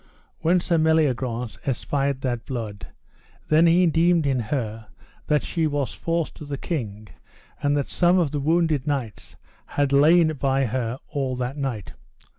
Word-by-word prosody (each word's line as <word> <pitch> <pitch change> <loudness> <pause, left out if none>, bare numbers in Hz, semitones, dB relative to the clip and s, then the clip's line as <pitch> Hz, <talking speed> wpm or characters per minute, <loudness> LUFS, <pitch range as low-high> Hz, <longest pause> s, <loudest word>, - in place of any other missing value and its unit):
When 175 +3 +3
Sir 170 -1 +1
Meliagrance 130 - +1
espied 135 +1 -1
that 120 -3 -3
blood, 110 -6 -5 0.6
then 160 +2 +5
he 175 +2 +5
deemed 165 0 +3
in 135 -2 +1
her 110 -2 -3 0.4
that 150 -1 +2
she 165 -2 0
was 145 -3 -2
false 165 -1 -2
to - - -12
the 145 -1 -5
king, 110 - -4 0.5
and 145 0 +2
that 140 - -1
some 175 +1 +3
of 165 -6 +1
the 145 - -2
wounded 155 -1 +1
knights 130 -7 -4 0.3
had 140 -1 0
lain 155 +3 +5
by 135 0 +1
her 120 0 -2
all 135 -3 -2
that 125 +2 -3
night. 130 -9 -4
140 Hz, 155 wpm, -24 LUFS, 125-160 Hz, 0.6 s, then